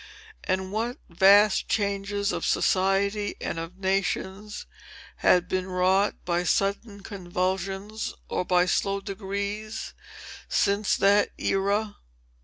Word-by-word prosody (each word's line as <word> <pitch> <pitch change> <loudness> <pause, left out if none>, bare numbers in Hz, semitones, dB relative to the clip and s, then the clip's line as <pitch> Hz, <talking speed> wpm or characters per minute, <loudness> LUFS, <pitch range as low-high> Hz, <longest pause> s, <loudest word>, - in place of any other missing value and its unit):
And 190 0 -1
what 230 +5 -2
vast 195 +4 +5
changes 200 0 0
of - - -3
society 200 +2 +1
and 165 - -3
of 165 +3 -7
nations 195 +2 -2 0.5
had 180 0 +3
been 185 0 -2
wrought 185 +2 +2
by 175 0 0
sudden 200 +3 -1
convulsions 190 +2 -3
or - - -1
by 180 0 +3
slow 195 +2 0
degrees, 200 +2 -5 0.6
since 200 +1 +2
that 205 +1 +4
era! 200 +2 0
195 Hz, 105 wpm, -26 LUFS, 185-205 Hz, 0.6 s, vast